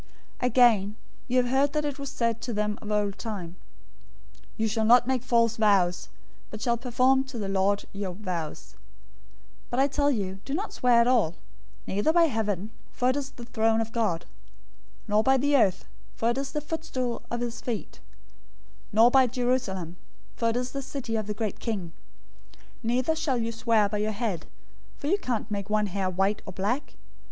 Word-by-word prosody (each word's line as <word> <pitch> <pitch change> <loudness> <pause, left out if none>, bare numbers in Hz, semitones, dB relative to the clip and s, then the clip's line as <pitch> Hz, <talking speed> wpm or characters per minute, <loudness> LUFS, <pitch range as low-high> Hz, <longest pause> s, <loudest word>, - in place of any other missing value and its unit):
005:033 250 - +1
"Again 220 -5 +4 0.3
you 255 0 +1
have 250 - +4
heard 275 +2 +3
that 300 -1 0
it 290 -1 -3
was 280 -1 -4
said 230 -3 -1
to 240 - -4
them 210 0 -1
of 210 - -7
old 205 -1 0
time, 190 -7 -5 1.0
'You 220 - +1
shall 220 +1 0
not 240 +2 +6
make 260 -1 0
false 230 -2 +2
vows, 195 -5 +2 0.4
but 215 - -7
shall 235 +1 +1
perform 255 +2 +2
to 265 -2 -8
the 205 -3 -3
Lord 195 +1 +1
your 195 -2 -4
vows,' 175 -5 -5 0.9
005:034 - - -32
but 245 - -1
I 275 - +5
tell 285 +1 +1
you, 195 -7 -2
don't 340 +10 -3
swear 245 -2 +4
at 235 - +2
all: 220 -10 +3 0.5
neither 205 +11 +1
by 340 +1 +5
heaven, 220 - -1 0.2
for 250 +1 +1
it - - -3
is 280 -1 -3
the 245 -4 -11
throne 225 -1 +1
of 225 0 -2
God; 215 -9 0 0.8
005:035 - - -29
nor 210 +1 +4
by 265 +4 +4
the 285 +2 +2
earth, 205 -8 +3 0.3
for 230 +1 +1
it 240 - -3
is 275 0 -4
the 300 - -2
footstool 295 -6 -3
of 240 0 -3
his 240 -1 -4
feet; 235 -4 -5 0.9
nor 225 +3 +6
by 265 -1 +6
Jerusalem, 240 -9 -1 0.4
for 230 - +1
it 225 - -1
is 250 0 -2
the 275 - -4
city 260 -4 -4
of 215 -2 -2
the 210 - -3
great 215 -2 -3
King. 200 -7 -3 0.6
005:036 - - -23 0.2
Neither 250 +7 +1
shall 310 -5 0
you 230 -1 -1
swear 225 -2 +2
by 210 +1 -2
your 215 +1 0
head, 205 -7 -3 0.5
for - - -8
you 380 +7 +2
can't 230 - -3
make 200 0 -3
one 210 0 +2
hair 195 -1 -1
white 195 +3 0
or - - -6
black. 210 +10 -2
230 Hz, 195 wpm, -27 LUFS, 205-255 Hz, 1.0 s, not